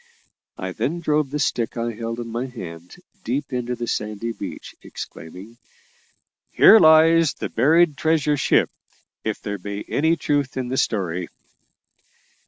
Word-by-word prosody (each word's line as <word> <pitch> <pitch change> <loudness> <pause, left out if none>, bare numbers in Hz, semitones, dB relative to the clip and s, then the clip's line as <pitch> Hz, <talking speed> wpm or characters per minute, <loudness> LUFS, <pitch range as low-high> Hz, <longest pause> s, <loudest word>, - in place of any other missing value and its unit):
I 95 0 -4
then 160 - -2
drove 150 -3 0
the 145 - -3
stick 120 -5 -1
I 115 0 -1
held 115 +1 -5
in 120 - -5
my 120 +3 -3
hand 90 -8 -10 0.3
deep 135 +4 -3
into 125 0 -2
the 120 0 -4
sandy 105 +1 -3
beach, - - -8
exclaiming, 95 +8 -10 0.9
"Here 225 - +7
lies 160 -2 +5
the - - -5
buried 155 +5 +3
treasure 155 -2 +2
ship, - - +2 0.5
if 110 -1 -3
there 100 -1 -4
be 100 +2 -6
any 160 +3 +2
truth 145 -5 -1
in 125 -1 -3
the 130 - -2
story." 90 -7 -1
120 Hz, 145 wpm, -22 LUFS, 105-150 Hz, 0.9 s, Here